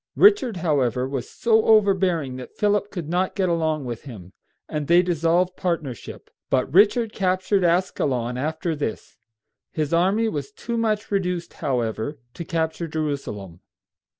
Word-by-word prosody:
Richard, 395 Hz, -, +5 dB
however, 130 Hz, -5 st, +1 dB
was 135 Hz, -2 st, -4 dB
so 225 Hz, -2 st, +2 dB
overbearing 190 Hz, -10 st, +3 dB
that 125 Hz, -, -10 dB
Philip 205 Hz, -1 st, +1 dB
could 175 Hz, -7 st, -6 dB
not 180 Hz, +3 st, 0 dB
get 190 Hz, -2 st, +1 dB
along 160 Hz, -4 st, 0 dB
with 120 Hz, -2 st, -5 dB
him, 95 Hz, -9 st, -10 dB, 0.3 s
and 150 Hz, -2 st, -3 dB
they 175 Hz, +1 st, +5 dB
dissolved 175 Hz, +1 st, +1 dB
partnership; 155 Hz, -, -4 dB, 0.2 s
but 135 Hz, +1 st, 0 dB
Richard 210 Hz, +4 st, +4 dB
captured 185 Hz, 0 st, +1 dB
Ascalon 140 Hz, -9 st, +1 dB
after 160 Hz, +5 st, -2 dB
this. 145 Hz, -7 st, -5 dB, 0.5 s
His 155 Hz, 0 st, -2 dB
army 195 Hz, +7 st, +3 dB
was 155 Hz, -1 st, -4 dB
too 235 Hz, +2 st, -5 dB
much 220 Hz, -2 st, -1 dB
reduced, 180 Hz, -3 st, -1 dB
however, 125 Hz, -1 st, -2 dB, 0.2 s
to 170 Hz, -, -6 dB
capture 165 Hz, -1 st, -2 dB
Jerusalem. 140 Hz, -, -4 dB
170 Hz, 140 wpm, -23 LUFS, 140-190 Hz, 0.5 s, Richard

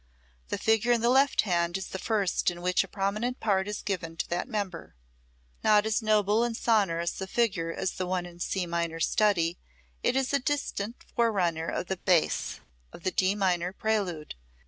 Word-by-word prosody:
The -, -, -2 dB
figure 225 Hz, +2 st, +2 dB
in 235 Hz, -1 st, +3 dB
the 235 Hz, -, +3 dB
left 270 Hz, +2 st, +4 dB
hand 175 Hz, -2 st, 0 dB
is 190 Hz, -, -6 dB
the 190 Hz, -, -5 dB
first 200 Hz, -5 st, +1 dB
in 175 Hz, 0 st, -7 dB
which 180 Hz, +1 st, +3 dB
a -, -, -10 dB
prominent 210 Hz, +6 st, -2 dB
part 195 Hz, -3 st, +1 dB
is 210 Hz, 0 st, -4 dB
given 165 Hz, -5 st, -3 dB
to -, -, -2 dB
that 175 Hz, +6 st, -1 dB
member. 200 Hz, -, -4 dB, 0.7 s
Not 210 Hz, 0 st, +5 dB
as 220 Hz, +2 st, +1 dB
noble 215 Hz, 0 st, +3 dB
and 235 Hz, -1 st, -1 dB
sonorous 190 Hz, -7 st, +1 dB
a 190 Hz, -, -3 dB
figure 190 Hz, -7 st, 0 dB
as 180 Hz, -, -2 dB
the 185 Hz, -, -4 dB
one 180 Hz, -1 st, -1 dB
in 175 Hz, -1 st, -11 dB
the 175 Hz, -, -3 dB
C 190 Hz, -2 st, -1 dB
minor 170 Hz, -1 st, -2 dB
study, 175 Hz, -2 st, +2 dB, 0.4 s
it -, -, +1 dB
is 270 Hz, +1 st, 0 dB
a 280 Hz, -, +4 dB
distinct 255 Hz, -5 st, -3 dB
forerunner 180 Hz, -8 st, +1 dB
of -, -, -2 dB
the 190 Hz, +1 st, -3 dB
bass 175 Hz, -3 st, +1 dB, 0.3 s
of 170 Hz, -, -13 dB
the 185 Hz, -, 0 dB
D 190 Hz, +2 st, +2 dB
minor 180 Hz, -3 st, +1 dB
Prelude. 195 Hz, -8 st, -1 dB
195 Hz, 190 wpm, -28 LUFS, 175-220 Hz, 0.7 s, Not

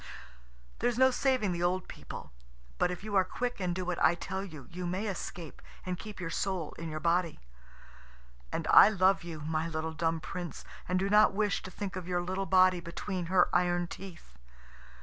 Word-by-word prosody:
There's 245 Hz, -1 st, +1 dB
no 260 Hz, +1 st, +6 dB
saving 255 Hz, -6 st, +1 dB
the 170 Hz, -1 st, -2 dB
old 180 Hz, +1 st, 0 dB
people; -, -, -9 dB, 0.5 s
but -, -, +3 dB
if 180 Hz, +1 st, -5 dB
you 210 Hz, -1 st, -4 dB
are 190 Hz, -, +6 dB
quick, 245 Hz, +6 st, -3 dB
and 180 Hz, -2 st, -1 dB
do 185 Hz, 0 st, -3 dB
what 180 Hz, -1 st, -2 dB
I 170 Hz, -, +5 dB
tell 190 Hz, +2 st, -4 dB
you, 155 Hz, -9 st, -9 dB
you 180 Hz, +1 st, -4 dB
may 185 Hz, +5 st, -2 dB
escape, 175 Hz, -5 st, -6 dB, 0.2 s
and 185 Hz, -1 st, -2 dB
keep 210 Hz, -3 st, -9 dB
your 170 Hz, -2 st, -4 dB
soul 185 Hz, -4 st, -2 dB
in 165 Hz, -1 st, -5 dB
your 155 Hz, 0 st, -4 dB
body. 170 Hz, 0 st, +1 dB, 1.1 s
And -, -, -2 dB
I -, -, +10 dB
love 190 Hz, -3 st, +3 dB
you, 165 Hz, -3 st, -7 dB
my 155 Hz, +1 st, -1 dB
little 160 Hz, 0 st, -3 dB
dumb 165 Hz, 0 st, 0 dB
Prince, 170 Hz, -1 st, -6 dB, 0.2 s
and 185 Hz, -, +2 dB
do 190 Hz, +1 st, +1 dB
not 210 Hz, 0 st, +5 dB
wish 210 Hz, -1 st, +1 dB
to -, -, -8 dB
think 195 Hz, 0 st, -5 dB
of 185 Hz, -2 st, -6 dB
your 175 Hz, -1 st, 0 dB
little 190 Hz, +2 st, -2 dB
body 185 Hz, -1 st, +5 dB
between 175 Hz, +1 st, -4 dB
her 180 Hz, 0 st, +4 dB
iron 175 Hz, 0 st, +2 dB
teeth. 170 Hz, -, -11 dB
180 Hz, 195 wpm, -31 LUFS, 170-195 Hz, 1.1 s, I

